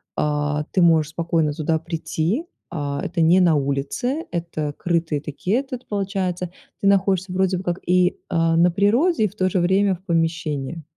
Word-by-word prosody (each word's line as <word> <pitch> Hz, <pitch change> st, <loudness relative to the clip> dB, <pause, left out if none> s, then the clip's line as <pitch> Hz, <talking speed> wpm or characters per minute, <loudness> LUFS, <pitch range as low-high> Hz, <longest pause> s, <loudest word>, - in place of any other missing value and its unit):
а, 150 Hz, 0 st, 0 dB
ты 185 Hz, -, +2 dB
можешь 160 Hz, -2 st, +4 dB
спокойно 165 Hz, -2 st, 0 dB
туда 160 Hz, +1 st, 0 dB
прийти. 165 Hz, -, -2 dB, 0.2 s
А, 145 Hz, -3 st, -3 dB
это 170 Hz, 0 st, -2 dB
не 165 Hz, +3 st, +5 dB
на 170 Hz, -4 st, +4 dB
улице, 140 Hz, -, -1 dB
это 165 Hz, -4 st, -3 dB
крытые 165 Hz, -4 st, -1 dB
такие 155 Hz, +8 st, -2 dB
и -, -, +3 dB
этот, 255 Hz, -2 st, -8 dB
получается. 190 Hz, -3 st, -2 dB, 0.3 s
Ты 200 Hz, -, +2 dB
находишься 190 Hz, -1 st, +2 dB
вроде 190 Hz, 0 st, +1 dB
бы 180 Hz, -, -6 dB
как 175 Hz, 0 st, -2 dB
и, 180 Hz, 0 st, +3 dB
а, 165 Hz, -1 st, +2 dB
на 175 Hz, +1 st, +5 dB
природе, 220 Hz, -, +2 dB
и -, -, +2 dB
в 200 Hz, -, -21 dB
то 185 Hz, -3 st, +1 dB
же 185 Hz, -, 0 dB
время 190 Hz, +2 st, +2 dB
в 180 Hz, -, -18 dB
помещении. 165 Hz, -3 st, -1 dB
175 Hz, 180 wpm, -22 LUFS, 160-190 Hz, 0.3 s, не